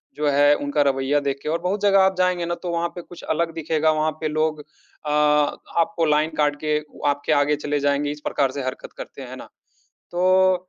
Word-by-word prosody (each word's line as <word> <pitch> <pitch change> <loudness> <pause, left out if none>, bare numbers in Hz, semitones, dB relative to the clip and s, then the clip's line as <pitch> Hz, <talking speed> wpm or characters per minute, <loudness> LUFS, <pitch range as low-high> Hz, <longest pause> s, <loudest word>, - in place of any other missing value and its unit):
जो 150 0 -1
है, 145 +1 +5
उनका 145 0 -1
रवैया 135 +2 +1
देखके 140 +1 -3
और 165 +2 0
बहुत 195 +3 -1
जगह 195 -1 +4
आप 190 0 +3
जाएँगे 180 -1 +1
ना, 170 - -1
तो 175 0 -5
वहाँ 170 0 0
पे 175 - -5
कुछ 175 0 -13
अलग 170 +1 0
दिखेगा। 160 -1 +1
वहाँ 155 0 +1
पे 155 - 0
लोग 155 0 0
अ, 150 0 -11
आपको 150 +4 +1
लाइन 150 +1 +2
काट 145 -1 +2
के 150 0 +1 0.3
आपके 145 +2 -1
आगे 145 0 +3
चले 145 0 -2
जाएँगे। 145 +1 0
इस 150 0 -8
प्रकार 135 -3 +1
से 140 - -4
हरकत 130 0 -6
करते - - -9
हैं - - -9
ना? - - -11 0.6
तो 185 0 +3
155 Hz, 210 wpm, -22 LUFS, 145-170 Hz, 0.6 s, है